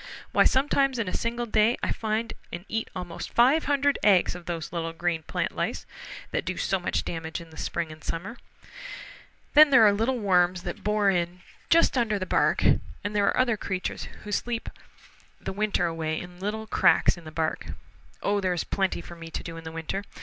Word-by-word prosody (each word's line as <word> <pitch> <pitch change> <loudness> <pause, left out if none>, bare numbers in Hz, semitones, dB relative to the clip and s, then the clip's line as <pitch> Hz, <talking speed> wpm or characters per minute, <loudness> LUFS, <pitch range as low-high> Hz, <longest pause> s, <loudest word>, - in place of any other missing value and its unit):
Why, - - +4
sometimes 275 0 +2
in 230 -4 -1
a - - -3
single 235 +1 -1
day 220 +1 +3
I - - 0
find 220 +1 -2 0.2
and 175 +2 -6
eat 225 0 -2
almost 180 -2 -6
five 265 +7 +5
hundred 285 0 +2
eggs 195 -4 +4
of 175 -1 -10
those 165 -1 -4
little 165 -1 -3
green 170 -1 -1
plant - - -2
lice - - -2 0.5
that - - -1
do - - -3
so - - 0
much - - -1
damage 160 0 -4
in 165 -1 -12
the - - -14
spring 170 -2 -3
and 155 0 -12
summer. 195 +9 -5 1.2
Then 305 0 +9
there 235 -5 +7
are 205 - +6
little 230 +5 0
worms 180 -4 +2
that 175 -2 -6
bore 210 -1 +3
in 175 0 -2 0.3
just 330 -5 +4
under 220 -3 +1
the 185 - -3
bark, - - +2 0.4
and 205 +1 -3
there 200 -1 +3
are - - +2
other 245 -4 +2
creatures 190 -2 -3 0.2
who 210 - -7
sleep 230 +3 -2 0.7
the - - -5
winter 205 -3 +1
away 160 -2 -2
in 180 0 -10
little 215 +3 -3
cracks - - +4
in 175 - -13
the 155 - -9
bark. 160 0 -2 0.6
Oh, 205 0 +1
there 185 -1 +1
is 175 - -1
plenty 190 -3 -1
for 170 - -10
me 165 -1 -9
to - - -5
do 165 - -7
in 165 0 -9
the 160 - -5
winter. 165 +5 -4
195 Hz, 205 wpm, -27 LUFS, 170-225 Hz, 1.2 s, Then